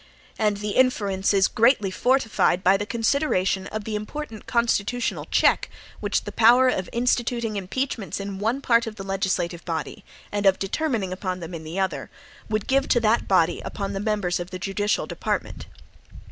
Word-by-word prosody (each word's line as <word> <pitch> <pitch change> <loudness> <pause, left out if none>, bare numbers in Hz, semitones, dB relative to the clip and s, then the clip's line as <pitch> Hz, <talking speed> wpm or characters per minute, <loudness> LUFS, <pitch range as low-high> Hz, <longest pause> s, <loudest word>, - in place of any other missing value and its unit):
And 210 -2 +2
the 210 +1 -3
inference 200 -6 +2
is 195 -2 +4
greatly 230 -4 +3
fortified 225 -4 +2
by 190 +2 +5
the 205 +1 -2
consideration 220 -5 0
of 215 +1 -5
the 215 0 -4
important 220 +2 -6
constitutional 235 0 0
check - - +3 0.3
which - - -1
the - - -6
power 245 +3 +6
of 190 -7 -2
instituting 235 -2 0
impeachments 205 +2 -3
in 195 -1 -5
one 230 +6 0
part 235 -3 +3
of 220 - -6
the 195 - -7
legislative 190 -3 -2
body, 160 -3 -4 0.3
and 205 -1 +1
of 190 - +5
determining 205 -3 -1
upon 185 -1 -4
them 170 0 -8
in 165 -1 -6
the 160 +4 -5
other, 190 -1 -2 0.4
would 215 -1 -1
give 270 +1 +2
to 240 - +3
that 225 +1 +2
body 175 -3 +2
upon 200 -1 -4
the 195 - -3
members 205 -4 -1
of 175 0 -5
the 185 - -6
judicial 200 +3 -1
department. - - -4
205 Hz, 175 wpm, -24 LUFS, 190-235 Hz, 0.4 s, power